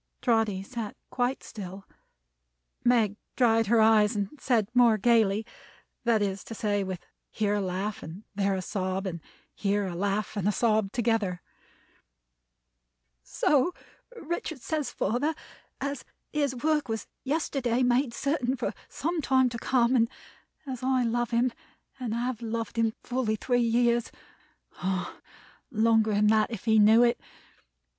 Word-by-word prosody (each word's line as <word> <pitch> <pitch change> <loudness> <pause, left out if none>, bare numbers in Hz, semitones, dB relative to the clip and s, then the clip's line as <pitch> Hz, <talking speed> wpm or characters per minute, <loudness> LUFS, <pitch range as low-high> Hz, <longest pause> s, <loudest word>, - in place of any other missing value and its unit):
Trotty 225 -5 +2
sat 225 0 -6 0.2
quite 250 +1 -1
still, 195 -2 -8 1.0
Meg 225 -4 +3 0.2
dried 225 -3 +3
her 230 +2 +4
eyes, 215 -1 +5
and 200 -1 -1
said 230 -7 +1
more 240 -3 +5
gayly: 220 -1 +3 0.6
that 225 -3 +3
is 195 -1 -2
to 225 - -7
say, 205 -2 0
with 185 -2 -4 0.3
here 205 -2 0
a 205 - +1
laugh, 190 +3 -3
and 170 +7 -9
there 195 -1 +1
a 185 - -3
sob, 190 0 -2
and 170 -3 -4 0.3
here 205 0 0
a 185 - -4
laugh 200 +4 -1
and 205 0 +1
sob 215 -2 +1
together: 225 -6 0 1.8
"So 285 - +1 0.4
Richard 325 - -4
says, 300 0 -2
father; 250 +11 -1 0.4
as 280 +1 -3 0.3
his 285 -3 0
work 300 +1 0
was 225 0 -3 0.2
yesterday 270 -4 0
made 250 +1 +2
certain 265 0 -1
for 245 - -3 0.2
some 335 +2 -2
time 260 -2 +3
to 235 -1 -6
come, 250 0 +2
and 230 -2 +3 0.6
as 260 -3 -5
I 260 -1 +2
love 240 0 0
him 240 +1 +1 0.5
and 235 -3 -2
have 240 0 -2
loved 230 0 -3
him 225 -1 +1
fully 245 -3 -1
three 245 +3 +1
years 235 0 +2 0.7
ah! 185 0 -3 0.5
longer 225 -1 +3
than 210 +1 +3
that, 215 +1 +4
if 225 -3 -7
he 220 -1 +5
knew 220 +3 +7
it! 240 0 +2
230 Hz, 145 wpm, -28 LUFS, 205-250 Hz, 1.8 s, knew